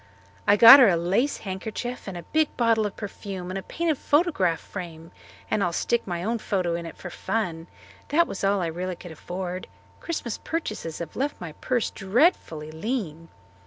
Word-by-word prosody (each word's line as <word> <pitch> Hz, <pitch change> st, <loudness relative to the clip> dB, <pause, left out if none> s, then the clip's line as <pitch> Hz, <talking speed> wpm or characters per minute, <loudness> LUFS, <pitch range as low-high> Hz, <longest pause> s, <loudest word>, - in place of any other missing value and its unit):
I 205 Hz, -, +6 dB
got 235 Hz, +6 st, +11 dB
her 245 Hz, -5 st, +8 dB
a 175 Hz, -, +3 dB
lace 195 Hz, +12 st, +1 dB
handkerchief 220 Hz, +6 st, -5 dB
and 190 Hz, -2 st, -5 dB
a 170 Hz, -, -7 dB
big 310 Hz, -, 0 dB
bottle 230 Hz, -3 st, +3 dB
of 200 Hz, -, -9 dB
perfume 195 Hz, -3 st, -6 dB
and 190 Hz, -, -3 dB
a -, -, -6 dB
painted 320 Hz, -, -2 dB
photograph 290 Hz, -, +2 dB
frame 165 Hz, -4 st, -8 dB, 0.4 s
and 215 Hz, -2 st, +2 dB
I'll 175 Hz, -, +1 dB
stick 235 Hz, +7 st, 0 dB
my 175 Hz, -1 st, -3 dB
own 230 Hz, +3 st, -1 dB
photo 185 Hz, -5 st, -1 dB
in 170 Hz, 0 st, -4 dB
it -, -, -10 dB
for 180 Hz, -, -8 dB
fun. 170 Hz, -7 st, -3 dB, 0.4 s
That 335 Hz, +4 st, +3 dB
was 200 Hz, -, -6 dB
really 195 Hz, -4 st, +1 dB
all 185 Hz, -, -2 dB
I 180 Hz, -, -3 dB
could 175 Hz, 0 st, -11 dB
afford. 180 Hz, +3 st, -5 dB, 0.3 s
Christmas 280 Hz, -9 st, -4 dB
purchases 215 Hz, -, -4 dB
have 170 Hz, -2 st, -7 dB
left 285 Hz, +3 st, -2 dB
my 170 Hz, -3 st, -6 dB
purse 240 Hz, +9 st, -1 dB
dreadfully 190 Hz, -, +1 dB
lean." 165 Hz, -, -4 dB
195 Hz, 185 wpm, -25 LUFS, 175-235 Hz, 0.4 s, got